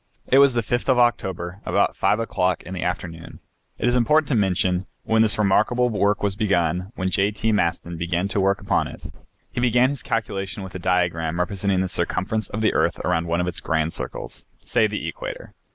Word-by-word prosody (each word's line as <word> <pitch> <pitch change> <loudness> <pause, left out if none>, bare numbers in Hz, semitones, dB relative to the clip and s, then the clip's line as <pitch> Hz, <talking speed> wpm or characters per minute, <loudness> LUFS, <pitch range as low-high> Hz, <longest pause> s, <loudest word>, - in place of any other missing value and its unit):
It 135 - +4
was 140 -3 +5
the 120 - +2
5th 120 +4 -2
of 130 - +4
October, 95 -7 0
about - - +1
5 105 - +2
o'clock 95 -5 0
in 90 - -8
the 90 - -4
afternoon, 85 -2 -5 0.4
it - - -1
is 120 - +2
important 150 +5 +3
to 135 - +2
mention, 95 -2 +1 0.2
when 110 0 +2
this 110 -1 +5
remarkable 110 +4 +2
work 105 -2 +1
was 100 -2 +1
begun, 90 -3 0
when 95 0 -2
J. 100 +1 +2
T. 110 +2 -1
Maston 85 -3 -1
began 85 +2 -1
to 100 - -1
work 95 0 +2
upon - - 0
it. - - -11 0.5
He - - -3
began 125 +1 +4
his 140 - -5
calculation 100 -3 -3
with 95 0 -9
a 95 - -5
diagram 85 -2 0
representing 95 +1 0
the 95 - 0
circumference 95 +4 -1
of 110 - -4
the 110 - +2
earth - - +1
around 85 -1 0
one 85 +1 0
of 90 - -2
its 90 - -3
grand 80 0 0
circles, - - -7
say 115 -3 +1
the 105 0 -4
equator. - - -7
100 Hz, 205 wpm, -23 LUFS, 90-115 Hz, 0.5 s, was